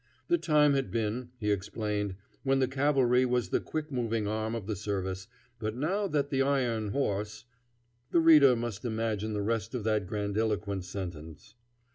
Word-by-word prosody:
The 345 Hz, 0 st, +3 dB
time 150 Hz, -2 st, +4 dB
had 135 Hz, -1 st, 0 dB
been, 115 Hz, +2 st, -2 dB
he 105 Hz, -3 st, 0 dB
explained, 105 Hz, 0 st, -2 dB, 0.3 s
when 135 Hz, -1 st, +2 dB
the 130 Hz, -1 st, +2 dB
cavalry 130 Hz, -2 st, +3 dB
was 125 Hz, -1 st, 0 dB
the -, -, +2 dB
quick 155 Hz, -1 st, -4 dB
moving 115 Hz, -4 st, -1 dB
arm 110 Hz, +2 st, -2 dB
of 110 Hz, -4 st, -5 dB
the 110 Hz, 0 st, -2 dB
service, 95 Hz, -2 st, -3 dB, 0.3 s
but 110 Hz, 0 st, -3 dB
now 190 Hz, +10 st, 0 dB
that 145 Hz, -5 st, -1 dB
the 135 Hz, -1 st, +2 dB
iron 125 Hz, -6 st, +1 dB
horse 105 Hz, -2 st, -2 dB, 0.6 s
The 170 Hz, -, +3 dB
reader 150 Hz, -6 st, +7 dB
must 115 Hz, -4 st, -4 dB
imagine 110 Hz, -2 st, -2 dB
the 105 Hz, -1 st, -1 dB
rest 115 Hz, +2 st, -1 dB
of 120 Hz, -, -3 dB
that 105 Hz, -3 st, 0 dB
grandiloquent 105 Hz, -1 st, -1 dB
sentence. 90 Hz, +2 st, -7 dB
115 Hz, 165 wpm, -30 LUFS, 105-135 Hz, 0.6 s, reader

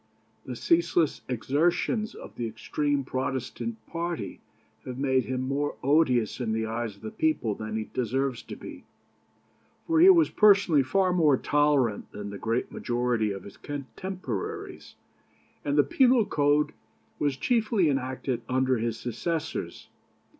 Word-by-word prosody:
The 125 Hz, -, -5 dB
ceaseless 170 Hz, +3 st, +2 dB
exertions 170 Hz, -, 0 dB
of -, -, -10 dB
the 120 Hz, -, -3 dB
extreme 145 Hz, +5 st, -1 dB
Protestant 125 Hz, -4 st, -4 dB
party 170 Hz, -, -4 dB, 0.4 s
have 125 Hz, -1 st, -6 dB
made 130 Hz, -1 st, +1 dB
him 130 Hz, -1 st, -2 dB
more 140 Hz, +3 st, -1 dB
odious 130 Hz, -6 st, +2 dB
in 115 Hz, -3 st, -1 dB
the 110 Hz, 0 st, -1 dB
eyes 115 Hz, -1 st, -3 dB
of 100 Hz, -, -22 dB
the 110 Hz, -, -5 dB
people 155 Hz, -9 st, 0 dB
than 110 Hz, +1 st, -5 dB
he 110 Hz, -, -4 dB
deserves 130 Hz, +1 st, -1 dB
to -, -, -9 dB
be; -, -, -10 dB, 1.0 s
for 325 Hz, -1 st, +2 dB
he 360 Hz, +3 st, +9 dB
was 335 Hz, -4 st, +6 dB
personally 200 Hz, -8 st, +5 dB
far 185 Hz, +8 st, +1 dB
more 155 Hz, -6 st, +4 dB
tolerant 145 Hz, -8 st, +1 dB
than 105 Hz, 0 st, -6 dB
the 100 Hz, -, -7 dB
great 115 Hz, +2 st, -1 dB
majority 120 Hz, -3 st, 0 dB
of 95 Hz, -2 st, -6 dB
his 100 Hz, -, -12 dB
contemporaries, 145 Hz, -, -6 dB, 0.7 s
and 145 Hz, 0 st, 0 dB
the 145 Hz, -, +7 dB
penal 250 Hz, -, +4 dB
code 145 Hz, -1 st, +2 dB, 0.5 s
was 145 Hz, -3 st, 0 dB
chiefly 220 Hz, -, +2 dB
enacted 130 Hz, -3 st, -1 dB
under 130 Hz, 0 st, +2 dB
his 115 Hz, 0 st, -2 dB
successors. 150 Hz, +7 st, -4 dB
135 Hz, 140 wpm, -27 LUFS, 120-160 Hz, 1.0 s, he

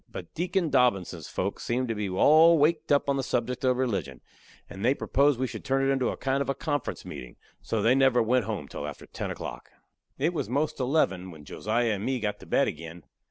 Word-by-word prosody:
But -, -, -9 dB
Deacon 175 Hz, -1 st, -1 dB
Dobbinses' 125 Hz, -9 st, +1 dB
folks 100 Hz, +2 st, -3 dB
seemed 125 Hz, +2 st, -1 dB
to -, -, +1 dB
be 105 Hz, -2 st, -3 dB
all 155 Hz, -, +6 dB
waked 155 Hz, +1 st, +2 dB
up 145 Hz, 0 st, +3 dB
on 140 Hz, 0 st, +1 dB
the -, -, 0 dB
subject 125 Hz, +1 st, -2 dB
of 130 Hz, -1 st, +2 dB
religion, 95 Hz, -, -2 dB, 0.5 s
and 95 Hz, +1 st, -8 dB
they 130 Hz, +4 st, +3 dB
proposed 140 Hz, -2 st, +2 dB
we 130 Hz, -, +1 dB
should 115 Hz, -4 st, -7 dB
turn 135 Hz, 0 st, +1 dB
it -, -, +3 dB
into 130 Hz, -2 st, 0 dB
a -, -, -4 dB
kind 135 Hz, +1 st, 0 dB
of 140 Hz, -, -2 dB
a 135 Hz, -, 0 dB
conference 145 Hz, -1 st, -3 dB
meetin'; 60 Hz, -, -8 dB, 0.3 s
so 110 Hz, -2 st, -2 dB
they 115 Hz, -, +5 dB
never 135 Hz, -2 st, +4 dB
went 125 Hz, +2 st, +2 dB
home 110 Hz, -3 st, -4 dB
till -, -, -6 dB
after -, -, -8 dB
ten -, -, -5 dB
o'clock. -, -, -7 dB, 0.5 s
It 160 Hz, +6 st, 0 dB
was 150 Hz, -, -3 dB
'most 145 Hz, +5 st, -1 dB
eleven 110 Hz, -, +1 dB
when 80 Hz, -4 st, -12 dB
Josiah 115 Hz, -, -1 dB
and 100 Hz, -1 st, -2 dB
me 130 Hz, +1 st, -1 dB
got 105 Hz, -2 st, -3 dB
to -, -, -13 dB
bed -, -, +2 dB
agin. 80 Hz, +1 st, -7 dB
125 Hz, 225 wpm, -27 LUFS, 105-140 Hz, 0.5 s, all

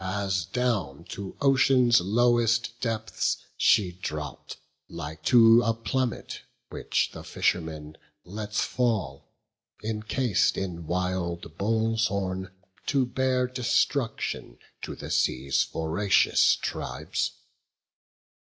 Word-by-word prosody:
As 95 Hz, -2 st, -1 dB
down 100 Hz, -, -1 dB
to 100 Hz, -1 st, -7 dB
ocean's 130 Hz, -4 st, +4 dB
lowest 120 Hz, +3 st, +2 dB
depths 115 Hz, -2 st, -1 dB, 0.2 s
she 95 Hz, -4 st, +3 dB
dropp'd, 75 Hz, -5 st, -6 dB, 0.3 s
Like 80 Hz, -2 st, -7 dB
to 115 Hz, -1 st, +7 dB
a 115 Hz, -1 st, +1 dB
plummet, 125 Hz, +1 st, -3 dB, 0.3 s
which -, -, -1 dB
the -, -, -9 dB
fisherman 80 Hz, -3 st, -2 dB, 0.3 s
Lets 105 Hz, +3 st, -3 dB
fall, 110 Hz, -, -1 dB, 0.5 s
encas'd 110 Hz, 0 st, 0 dB
in 85 Hz, -4 st, -4 dB
wild 90 Hz, -2 st, -2 dB
bull's 115 Hz, +2 st, +1 dB
horn, 95 Hz, -1 st, -3 dB, 0.4 s
to 135 Hz, -3 st, +2 dB
bear 130 Hz, 0 st, +1 dB
Destruction 125 Hz, 0 st, -1 dB, 0.2 s
to -, -, -6 dB
the -, -, -8 dB
sea's 65 Hz, +1 st, +1 dB
voracious 85 Hz, +5 st, +2 dB
tribes. -, -, -3 dB
105 Hz, 100 wpm, -27 LUFS, 90-120 Hz, 0.5 s, to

